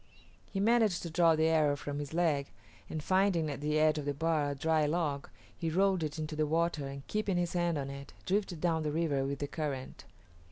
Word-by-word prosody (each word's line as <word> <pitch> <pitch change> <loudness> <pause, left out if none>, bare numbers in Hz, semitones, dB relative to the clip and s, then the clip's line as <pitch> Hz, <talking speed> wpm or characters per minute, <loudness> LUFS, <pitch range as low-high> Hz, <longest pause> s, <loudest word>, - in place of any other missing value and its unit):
He 195 - -2
managed 220 -3 +3
to 170 - -5
draw 165 0 +4
the 160 0 +2
arrow 155 -3 +3
from 145 +1 -5
his 145 -1 -5
leg, 160 -5 +1 0.4
and 155 -2 -4
finding 185 -4 +2
at 140 - -6
the 150 +1 +1
edge 155 0 +3
of 145 - -5
the 145 -1 -1
bar 155 -1 +1
a 140 - -3
dry 155 +1 +2
log, 150 -3 -1 0.3
he 165 - -2
rolled 190 +2 +2
it 155 0 -3
into 155 0 -4
the 155 0 +1
water, 160 -2 0
and 140 0 -8
keeping 210 -3 -1
his 175 -1 0
hands 175 -2 +1
on 140 -1 -3
it, 140 0 -9
drifted 190 -3 0
down 165 -1 +1
the 150 -1 -1
river 150 -4 0
with 140 +1 -2
the 145 - -3
current. 140 -4 -5
155 Hz, 225 wpm, -32 LUFS, 145-175 Hz, 0.4 s, draw